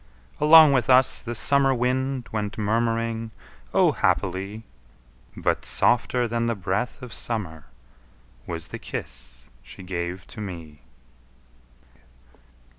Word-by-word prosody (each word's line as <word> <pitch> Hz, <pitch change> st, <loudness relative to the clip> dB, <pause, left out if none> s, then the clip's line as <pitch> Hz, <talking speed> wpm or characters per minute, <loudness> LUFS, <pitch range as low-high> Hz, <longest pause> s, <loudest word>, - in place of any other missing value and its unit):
Along 155 Hz, -1 st, +8 dB
with 130 Hz, -3 st, +1 dB
us 130 Hz, 0 st, +4 dB
the 120 Hz, 0 st, -5 dB
summer 135 Hz, +2 st, +2 dB
wind 130 Hz, +1 st, -1 dB
Went 105 Hz, -1 st, -3 dB
murmuring 115 Hz, +1 st, -1 dB, 0.4 s
O, -, -, +4 dB
happily! 95 Hz, +4 st, -1 dB, 0.7 s
But -, -, 0 dB
softer 120 Hz, 0 st, +1 dB
than 115 Hz, 0 st, -1 dB
the 115 Hz, -, 0 dB
breath 105 Hz, +7 st, -3 dB
of 125 Hz, -, -8 dB
summer 90 Hz, -10 st, -4 dB, 0.8 s
Was 85 Hz, -1 st, -5 dB
the -, -, -7 dB
kiss -, -, -8 dB
she -, -, -12 dB
gave 90 Hz, 0 st, -4 dB
to 110 Hz, -, -8 dB
me. 85 Hz, -7 st, -8 dB
115 Hz, 115 wpm, -24 LUFS, 95-125 Hz, 0.8 s, Along